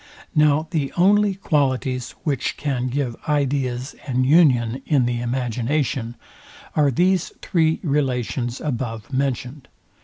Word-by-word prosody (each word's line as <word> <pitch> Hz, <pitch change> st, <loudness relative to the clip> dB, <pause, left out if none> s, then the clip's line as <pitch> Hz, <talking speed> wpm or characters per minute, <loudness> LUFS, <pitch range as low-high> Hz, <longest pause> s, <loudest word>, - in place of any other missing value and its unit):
Now 150 Hz, +1 st, +3 dB
the 145 Hz, -4 st, -1 dB
only 200 Hz, +2 st, +4 dB
qualities, 130 Hz, -7 st, -1 dB
which 140 Hz, -4 st, -1 dB
can 135 Hz, -4 st, -1 dB
give 130 Hz, -2 st, -2 dB
ideas 135 Hz, -3 st, 0 dB
an 130 Hz, -1 st, +1 dB
union 130 Hz, -5 st, +4 dB
in 140 Hz, -6 st, +3 dB
the 120 Hz, -1 st, -1 dB
imagination, 125 Hz, 0 st, -1 dB, 0.6 s
are 150 Hz, -3 st, +4 dB
these 180 Hz, +6 st, +1 dB
three 160 Hz, -2 st, +2 dB
relations 130 Hz, -, -1 dB
above 120 Hz, -3 st, -4 dB
mentioned. 135 Hz, 0 st, -2 dB
135 Hz, 115 wpm, -22 LUFS, 125-150 Hz, 0.6 s, only